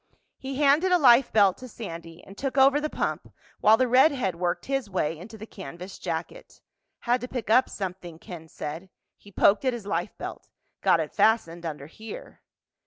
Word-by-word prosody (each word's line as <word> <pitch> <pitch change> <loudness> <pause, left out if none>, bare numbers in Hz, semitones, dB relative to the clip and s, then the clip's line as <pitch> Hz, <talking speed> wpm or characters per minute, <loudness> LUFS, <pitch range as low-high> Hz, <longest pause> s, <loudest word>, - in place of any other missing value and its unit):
He 270 0 -6
handed 295 +6 +3
a 360 - +6
life 255 -4 +5
belt 200 -4 +4
to 255 - -9
Sandy 170 -8 -9
and 195 - -13
took 270 +4 -4
over 275 +2 +5
the 305 - -2
pump - - -3 0.3
while 220 +1 +6
the 255 - +2
redhead 255 - +3
worked 175 +1 -2
his 270 -5 -2
way 170 -4 -1
into 200 +7 -11
the 220 - -9
canvas 185 -2 -10
jacket. - - -6 0.4
"Had 245 +1 +1
to 250 - -5
pick 240 -5 -4
up 255 +3 +5
something," 180 -4 -6
Ken 165 -1 -10
said. 160 +4 -7 0.3
He 205 - -18
poked 200 +4 +3
at 260 -2 +1
his 235 -4 -7
life 180 0 -3
belt. - - -8 0.3
"Got - - +3
it - - -6
fastened 175 -7 +1
under 150 -3 -6
here." 220 - -11
215 Hz, 185 wpm, -26 LUFS, 175-260 Hz, 0.4 s, a